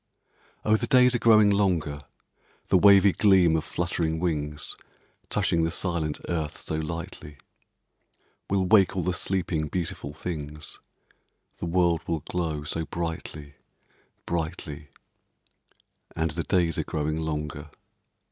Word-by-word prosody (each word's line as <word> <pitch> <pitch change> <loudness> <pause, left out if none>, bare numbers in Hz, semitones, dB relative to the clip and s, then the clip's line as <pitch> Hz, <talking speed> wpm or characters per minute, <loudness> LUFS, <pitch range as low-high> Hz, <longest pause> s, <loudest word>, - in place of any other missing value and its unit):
Oh, 110 0 +4
the - - -3
days 125 -1 +5
are 120 - +1
growing 110 -3 +6
longer, 85 -8 0 0.7
The - - +5
wavy 100 0 +7
gleam 95 -5 +4
of 80 - 0
fluttering 85 -2 -2
wings, 75 -3 -2 0.5
Touching 85 -1 +1
the 80 - +1
silent 85 -3 -2
earth 80 -4 -2
so - - -5
lightly, 80 -2 -6 1.1
Will 95 -1 +1
wake 95 -1 +4
all 90 - 0
the 90 +2 0
sleeping, 90 -4 -1
beautiful 80 -4 -4
things, 75 -1 -4 0.8
The - - -3
world 85 -1 +2
will 80 -2 -1
glow 80 -2 -3
so 80 +2 -2
brightly 80 -3 -5 0.7
brightly; 80 -3 -4 1.3
And 80 -1 0
the 85 +2 -3
days 85 -5 +1
are - - 0
growing 75 0 -2
longer. 75 -1 -4
85 Hz, 125 wpm, -26 LUFS, 75-90 Hz, 1.3 s, wavy